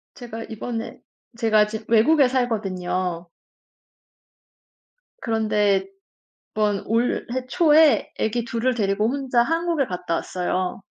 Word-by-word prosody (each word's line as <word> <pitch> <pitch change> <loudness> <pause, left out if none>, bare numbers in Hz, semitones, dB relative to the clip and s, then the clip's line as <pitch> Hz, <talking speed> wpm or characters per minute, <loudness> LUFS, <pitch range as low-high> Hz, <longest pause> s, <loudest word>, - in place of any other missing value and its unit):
제가 230 -3 -8
이번에 225 +1 -6 0.4
제가 220 -2 +3
지금 220 +1 -6
외국에 260 +6 +5
살거든요. 185 -8 -2 1.9
그런데 210 -3 +1 0.8
이번 205 -2 +1
올해 230 +2 0 0.2
초에 310 -1 +4
아기 230 +2 -1
2 230 +1 -3
을 255 - +3
데리고 210 -1 0
혼자 260 -2 +1
한국에 330 0 0
갔다 180 -3 -3
왔어요. 185 +2 -3
225 Hz, 225 characters per minute, -23 LUFS, 200-250 Hz, 1.9 s, 외국에